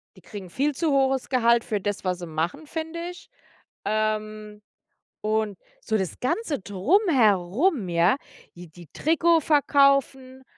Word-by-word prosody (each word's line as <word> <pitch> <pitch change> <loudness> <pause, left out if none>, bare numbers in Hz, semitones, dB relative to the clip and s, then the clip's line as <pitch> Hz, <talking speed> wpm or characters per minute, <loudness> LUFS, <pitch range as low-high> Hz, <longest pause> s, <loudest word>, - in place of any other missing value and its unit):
Die - - -17
kriegen 195 -4 -10
viel 285 +9 0
zu 315 +2 -1
hohes 270 -1 +1
Gehalt 235 -2 +3
für 210 - -2
das, 205 0 -3
was 180 -1 -2
sie 175 - -7
machen, 165 - -3
finde 320 +1 -5
ich. 355 - -12 0.6
Ähm, 215 0 -2 0.6
und 215 -2 -1 0.2
so 220 - -1
das 190 -4 -4
ganze 290 - -2
Drumherum, 220 - +2
ja, 175 +8 +3 0.4
die 175 -1 -12
die 170 0 -15
Trikot 330 +2 +2
verkaufen 275 -3 +2
230 Hz, 135 wpm, -24 LUFS, 200-285 Hz, 0.6 s, Gehalt